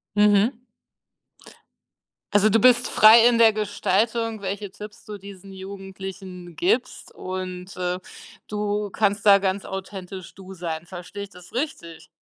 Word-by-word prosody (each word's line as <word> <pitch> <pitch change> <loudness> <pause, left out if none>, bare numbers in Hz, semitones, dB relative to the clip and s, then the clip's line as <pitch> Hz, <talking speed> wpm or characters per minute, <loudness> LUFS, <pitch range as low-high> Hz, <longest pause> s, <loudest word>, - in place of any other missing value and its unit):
Mhm. 210 +3 +4 1.7
Also, 205 +1 +5
du 225 +2 +4
bist 245 +1 +5
frei 225 +2 +7
in 240 -1 +3
der 225 -1 +7
Gestaltung, 215 +2 0
welche 200 +1 -4
Tipps 210 +2 -11
du 210 -1 -8
diesen 195 0 -12
Jugendlichen 190 -2 -9
gibst 370 +5 -1
und, 185 0 -6
äh, 180 0 -2 0.5
du 210 -1 -2
kannst 205 0 0
da 200 -1 +8
ganz 195 0 -1
authentisch 190 -1 -7
du 190 0 -11
sein, 170 -2 -5
verstehe 180 +3 -8
ich 200 - -9
das 180 -2 -16
richtig? 170 - -5
200 Hz, 135 wpm, -24 LUFS, 185-210 Hz, 1.7 s, da